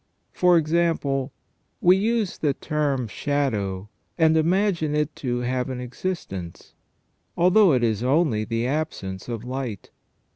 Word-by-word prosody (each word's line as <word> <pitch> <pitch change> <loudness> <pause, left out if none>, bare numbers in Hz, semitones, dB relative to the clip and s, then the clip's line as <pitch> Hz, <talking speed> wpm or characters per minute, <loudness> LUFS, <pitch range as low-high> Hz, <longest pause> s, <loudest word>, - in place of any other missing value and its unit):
For 180 -1 +4
example, 155 -4 0 0.5
we 180 +1 +6
use 215 0 0
the 145 -3 +1
term 145 -5 -1
shadow, 105 -7 -2 0.3
and 160 -1 +4
imagine 170 -2 +1
it 150 0 -1
to 120 -2 -2
have 125 +1 -1
an 130 -1 -4
existence, 125 - -6 0.6
although 185 +2 +5
it 125 -2 +2
is 110 -2 +1
only 130 -4 +2
the 115 +1 -2
absence 125 -10 -3
of 115 -2 -4
light. 125 -5 -5
140 Hz, 125 wpm, -24 LUFS, 120-170 Hz, 0.6 s, we